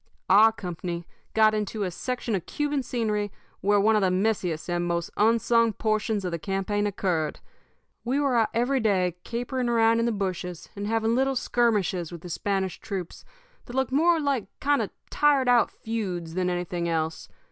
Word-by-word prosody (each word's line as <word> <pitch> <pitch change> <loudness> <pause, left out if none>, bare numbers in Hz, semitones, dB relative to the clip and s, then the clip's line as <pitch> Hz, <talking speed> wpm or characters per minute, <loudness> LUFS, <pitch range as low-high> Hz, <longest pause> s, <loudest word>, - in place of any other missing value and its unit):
"Our 215 +3 +8
company 175 -3 -5 0.3
got 215 -1 +5
into 210 0 -2
a 185 - -2
section 245 +4 -3
of 190 -5 -2
Cuban 295 -1 -1
scenery 215 -5 -1 0.3
where 205 +1 +3
one 215 +2 +4
of 210 - +3
the 190 - +3
messiest 185 -4 0
and 175 0 -1
most 170 0 -2
unsung 230 +1 +3
portions 215 -2 -1
of 180 - -2
the 170 - -3
campaign 195 +3 -1
occurred. 180 -6 -1 0.6
We 255 +4 0
were 280 -3 +1
out 225 -2 +3
every 245 +4 +1
day 185 -6 +1
capering 245 +1 -2
around 230 -1 +4
in 230 - +1
the - - +1
bushes, 185 -4 -4
and 200 0 -4
having 225 +1 +1
little 265 +2 +1
skirmishes 205 -9 +1
with 170 -2 -8
the 180 - -9
Spanish 190 +1 -1
troops 190 -5 -6 0.4
that 245 - -9
looked 265 -1 0
more 330 +4 +4
like 280 -8 0
kind 290 0 +2
of - - -2 0.2
tired 285 -3 +3
out 245 -1 +5
feuds 185 -7 -4
than 180 0 0
anything 175 -1 -2
else. 160 -1 -2
210 Hz, 180 wpm, -26 LUFS, 180-235 Hz, 0.6 s, Our